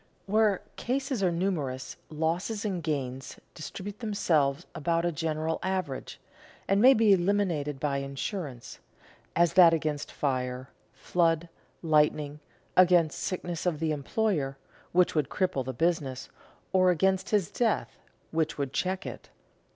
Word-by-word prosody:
Where 210 -1 +2
cases 265 -2 -1
are 185 -2 +3
numerous, 165 -8 -2
losses 170 +8 -2
and 190 -4 -2
gains 135 -4 -4
distribute 195 +8 -7
themselves 160 - +1
about 165 +1 0
a 175 - +1
general 160 0 -2
average, 185 -8 -3 0.5
and 195 +1 +3
may 260 +3 +8
be 220 -2 +5
eliminated 175 -7 0
by 140 -1 0
insurance, 140 - -5 0.6
as 170 -1 +3
that 170 -3 +7
against 150 -2 -3
fire, 130 -2 -2 0.2
flood, 165 +4 0 0.3
lightning, 150 -2 +2 0.4
against 175 -2 +5
sickness 175 -1 -3
of 160 -4 0
the 160 -1 0
employer, 150 -2 -1 0.3
which 180 0 +3
would 150 -3 0
cripple 185 -9 0
the 130 - -4
business, 140 -2 -1 0.4
or 185 -1 +5
against 190 +2 +2
his 205 -6 +1
death, 230 -3 0 0.4
which 160 -1 0
would 140 -2 -3
check 185 0 -1
it. - - -8
165 Hz, 130 wpm, -28 LUFS, 145-190 Hz, 0.6 s, may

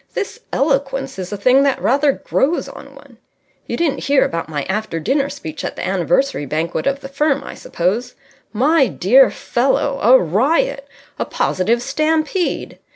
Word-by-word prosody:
This 400 - -4
eloquence 270 -3 -1
is 185 +1 -5
a 205 - -3
thing 255 +6 +4
that 275 -1 +1
rather 280 +3 +2
grows 300 +6 -1
on - - -12
one. - - -17 0.5
You - - -3
didn't 325 -5 -1
hear 280 0 +3
about 165 -1 -4
my 145 -3 -3
after 200 -4 -3
dinner 275 - 0
speech 160 - -7
at - - -4
the - - -5
anniversary 185 - 0
banquet 160 - -2
of 275 0 -1
the 270 - -7
firm, 280 0 0
I - - -8
suppose? 215 +9 -2 0.4
My 275 +5 +3
dear 235 +8 +4
fellow, 275 +2 0
a 250 +5 +7
riot! 275 - 0 0.3
A - - 0
positive 225 +6 0
stampede. 310 +6 -1
270 Hz, 160 wpm, -18 LUFS, 195-280 Hz, 0.5 s, a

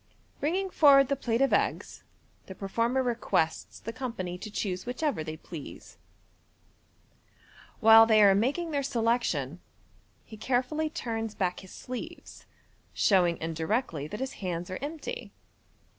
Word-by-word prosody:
Bringing 370 +6 -1
forward 275 -5 +6
the 280 - +2
plate 240 -1 0
of 275 - +2
eggs, - - -1 0.5
the 190 - -8
performer 230 +7 0
requests 230 -9 -1
the 230 - -7
company 230 -9 -4
to 215 +4 -8
choose 190 -3 -3
whichever 255 - -1
they 155 0 -6
please. 155 -2 -10 1.8
While 225 0 +8
they 215 -2 +6
are 200 -1 +7
making 280 - 0
their 285 -2 0
selection, 230 - 0 0.7
he 220 - -11
carefully 260 +7 0
turns 225 -8 -4
back 180 -3 -1
his 190 - -13
sleeves, 255 +7 -8 0.5
showing 175 -4 +3
indirectly 165 - -2
that 210 - -7
his 265 +1 -3
hands 180 -1 -3
are 185 - -4
empty. 320 - -6
230 Hz, 130 wpm, -28 LUFS, 185-270 Hz, 1.8 s, While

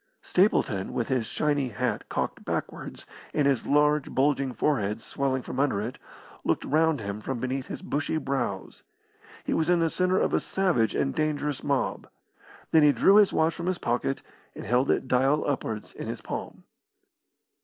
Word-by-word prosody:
Stapleton, 115 - +1
with 120 - -2
his 125 -4 0
shiny 145 -3 0
hat 125 +3 -2
cocked - - -3
backwards, - - -5 0.3
and 150 - +2
his 140 -3 +1
large, 150 0 +3
bulging 135 -1 +1
forehead 110 -7 0
swelling 130 +1 -2
from 130 - -5
under 140 -8 +2
it, 115 +5 -5 0.4
looked - - 0
round 160 0 +2
him 100 +1 -5
from 130 +2 -3
beneath 130 +2 -3
his - - -7
bushy 145 +2 -1
brows. 130 -10 -3 0.6
He - - -1
was 160 - +1
in 180 - +5
the 165 -1 +1
centre 185 +1 +2
of - - +1
a - - +4
savage 180 - +1
and 135 -1 0
dangerous 150 -2 -1
mob. 140 -2 -1 0.6
Then 160 - +6
he 150 -1 +7
drew 190 - +5
his 210 -2 +6
watch 160 +1 +2
from 170 - -5
his 185 -1 0
pocket 120 +1 -1 0.3
and - - -7
held 125 +4 +2
it - - +1
dial 135 +4 +2
upwards 110 -6 -3
in - - -7
his - - -5
palm. - - -6
140 Hz, 175 wpm, -27 LUFS, 125-155 Hz, 0.6 s, he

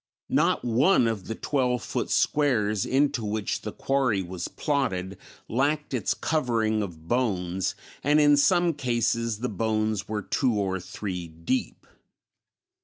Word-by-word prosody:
Not - - +2
one 125 +3 +4
of 110 -5 -3
the 115 - -3
twelve 125 -3 0
foot - - -3
squares 110 -9 +2
into 140 -2 +1
which 105 0 -2
the - - -5
quarry 130 -8 0
was 90 -1 -5
plotted 100 -10 -1 0.3
lacked 145 +4 0
its 120 -6 0
covering 115 -8 0
of 85 -5 -7
bones, 95 -7 0 0.3
and 150 +2 +4
in 145 -1 +6
some 175 +3 +3
cases 115 -4 -1
the 125 - 0
bones 110 0 -1
were 105 -1 -3
two 125 +3 +1
or 95 -2 -1
three 90 -1 -5
deep. 85 +11 -3
115 Hz, 135 wpm, -26 LUFS, 100-135 Hz, 0.3 s, in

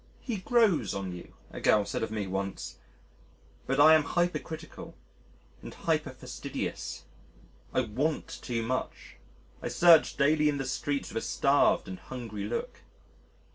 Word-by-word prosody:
"He 235 -5 -3
grows 190 - +2
on 95 -2 -4
you," 90 - -12 0.2
a - - -8
girl 105 -1 +4
said - - -3
of 110 - -1
me 105 -2 -3
once. 95 +1 -4 0.9
But 135 +2 0
I 155 +2 +9
am 155 - +6
hypercritical 165 0 -3 0.7
and - - -9
hyperfastidious. - - -3 0.7
I - - +2
want 130 +7 -2
too 115 -2 -2
much.... 130 +3 -4 0.4
I - - -3
search 170 -2 +5
daily 150 +1 +3
in 145 - -1
the 135 - -3
streets 140 +2 -2
with 115 - -1
a - - -4
starved 140 +1 +3
and 95 -1 -7
hungry 110 -5 -6
look. 115 +3 -4
135 Hz, 140 wpm, -29 LUFS, 105-155 Hz, 0.9 s, I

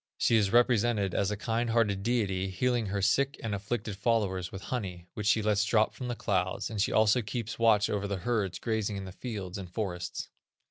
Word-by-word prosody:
She 115 - +3
is 100 -3 +3
represented 120 -5 +3
as 100 - +1
a 105 - -2
kind 115 +2 -1
hearted 110 -4 +2
deity, 100 -4 0
healing 120 +4 0
her 100 0 -2
sick 140 +7 +2
and 110 -2 -2
afflicted 105 +1 -3
followers 100 -5 0
with 95 - -8
honey, 90 -8 -4
which 105 -1 -3
she 110 -1 +3
lets 105 -1 +2
drop 110 0 +2
from 125 - -6
the 120 - -2
clouds, 95 -1 -1
and 105 -3 -1
she - - +1
also 110 +3 +4
keeps 115 +1 -5
watch 110 -2 +4
over 100 -1 -1
the 100 -1 -2
herds 105 -7 0
grazing 110 -3 -1
in 95 - -5
the 95 - -7
fields 100 -3 -6
and 95 -2 -7
forests. 90 -2 -4
105 Hz, 205 wpm, -30 LUFS, 95-115 Hz, -, also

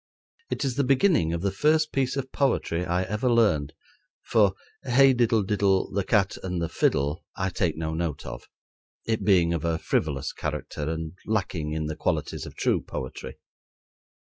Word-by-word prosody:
It - - -2
is 130 -1 -2
the 140 - +3
beginning 135 - +3
of 85 +1 -3
the 100 - +1
first 155 +9 +2
piece 135 0 0
of 130 -1 -4
poetry 90 -10 0
I 90 +2 +1
ever 105 +6 -1
learned; 105 -12 +2 0.5
for 100 -4 +3 0.3
"Hey, 135 +1 +5
diddle 115 -3 +2
diddle, 100 -1 +1
The 100 0 0
cat 100 -1 +1
and 90 -2 -3
the 85 -1 -2
fiddle," 75 +6 0
I 95 0 -1
take 85 -3 -1
no 80 0 -3
note 80 -3 -3
of, - - -8 0.6
it 110 -1 -1
being 90 -4 +4
of 85 - -2
a 85 -1 0
frivolous 75 -4 -1
character 75 0 -4
and 80 -1 -4
lacking 90 -8 -1
in 80 0 -2
the 75 0 -3
qualities - - -2
of - - -11
true - - +1
poetry. 65 - -7
95 Hz, 170 wpm, -26 LUFS, 80-120 Hz, 0.6 s, Hey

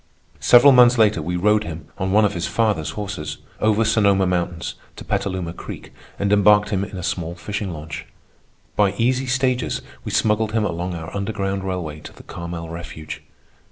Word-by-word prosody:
Several 135 +3 +7
months 125 -1 +7
later 105 -6 +4
we 90 +3 -3
rode 105 +4 +3
him, 80 -4 -7
on 95 0 -1
one 105 +2 +5
of 105 - 0
his 85 -2 -2
father's 105 -9 0
horses, 100 -7 -4 0.2
over 110 +1 +2
Sonoma 100 -3 +3
Mountains 85 -2 -2 0.2
to - - -10
Petaluma 90 -4 -2
Creek - - -9 0.2
and 100 0 +1
embarked 105 0 +5
him 100 -1 0
in 100 - -7
a 90 - -5
small 85 -1 -3
fishing 100 +2 -4
launch. 75 -1 -7 0.7
By 100 -2 +3
easy 125 +5 +1
stages 130 -1 0 0.2
we - - -5
smuggled 110 0 +1
him 110 -2 +1
along 90 -1 -3
our 80 +2 -7
underground 100 -1 -2
railway 85 -5 -4
to - - -11
the - - -15
Carmel 85 -1 -6
refuge. 80 -2 -7
100 Hz, 175 wpm, -22 LUFS, 85-105 Hz, 0.7 s, Several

